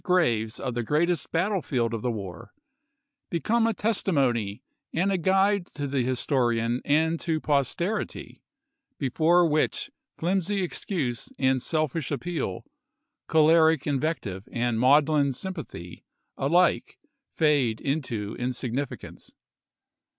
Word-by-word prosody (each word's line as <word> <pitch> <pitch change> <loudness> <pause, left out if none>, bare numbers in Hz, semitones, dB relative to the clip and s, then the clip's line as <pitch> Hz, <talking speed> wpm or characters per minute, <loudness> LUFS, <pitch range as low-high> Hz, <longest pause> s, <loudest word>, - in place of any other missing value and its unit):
graves 120 - +1
of 125 -2 -3
the 120 - -1
greatest 160 +8 0
battlefield 165 - 0
of 115 - -3
the 125 - -1
war, 95 -7 -7 0.7
be 170 - -1
come 230 +5 +2
a - - +2
testimony 130 - 0 0.3
and 185 +5 +1
a 190 - +1
guide 195 +2 +3
to 145 - -5
the 135 -1 0
historian 120 -2 0
and 160 +3 +2
to 160 -2 -1
posterity, 165 +8 -2 0.6
before 165 +6 +3
which 155 -1 0 0.3
flimsy 190 +3 0
excuse 155 - -3
and 130 -1 +2
self 155 -1 -1
ish 160 -4 -2
appeal, 145 - -3 0.6
choleric 160 -1 +4
invective 135 - -2
and 120 -1 0
maudlin 145 +2 +4
sym 190 +9 -5
pathy, 90 - -9 0.3
ahke 175 +6 +2 0.4
fade 145 -8 +2
into 120 -8 -3
insignificance. 125 +2 -4
145 Hz, 115 wpm, -26 LUFS, 120-170 Hz, 0.7 s, choleric